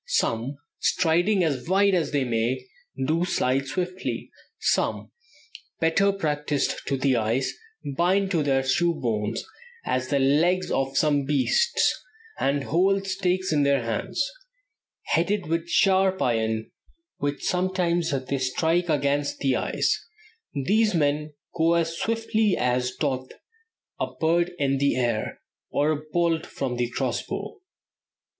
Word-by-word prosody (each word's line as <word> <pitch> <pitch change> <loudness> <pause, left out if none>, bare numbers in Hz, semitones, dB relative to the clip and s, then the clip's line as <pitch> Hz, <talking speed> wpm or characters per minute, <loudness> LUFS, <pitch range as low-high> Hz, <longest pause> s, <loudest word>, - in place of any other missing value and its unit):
Some, 135 - 0 0.2
striding 175 +3 +2
as 145 -2 -1
wide 200 +1 +4
as 175 -4 +1
they 145 -2 +1
may, 120 +1 -1 0.4
do 160 +5 +1
slide 135 -5 0
swiftly; 180 +5 -3 0.3
some, - - 0 0.7
better 165 +5 +3
practiced 150 -6 -1
to 140 - 0
the 130 0 +2
ice, 115 +4 0 0.4
bind 190 +4 +2
to 165 -4 +2
their 135 -2 +2
shoes 170 +5 +1
bones, 110 -2 -1 0.4
as 130 0 -1
the 140 - +1
legs 160 +7 +2
of 135 0 0
some 145 -3 +2
beasts, 150 - +2 0.4
and 140 0 +1
hold 195 +6 +2
stakes 185 -2 0
in 150 - +3
their 140 -3 +2
hands, 115 - -1 0.8
headed 195 +4 0
with 165 +2 -2
sharp 190 0 +3
iron, 110 -2 0 0.5
which 145 0 -3
sometimes 180 -2 0
they 135 0 -2
strike 165 +7 +1
against 145 -1 +1
the 135 -2 +1
ice; - - 0 0.6
these 215 +1 +3
men 150 0 0 0.2
go 165 +1 +3
as 165 -1 0
swiftly 220 -1 +1
as 125 0 0
doth 130 -3 -2 0.7
a - - 0
bird 170 +2 +2
in 135 -3 +1
the 140 0 +2
air, 120 -4 -1 0.3
or 150 +2 +1
a 150 -1 -2
bolt 170 -1 +1
from 125 -3 -3
a 120 -1 0
cross 125 - -1
bow." 400 - -6
150 Hz, 135 wpm, -25 LUFS, 135-180 Hz, 0.8 s, wide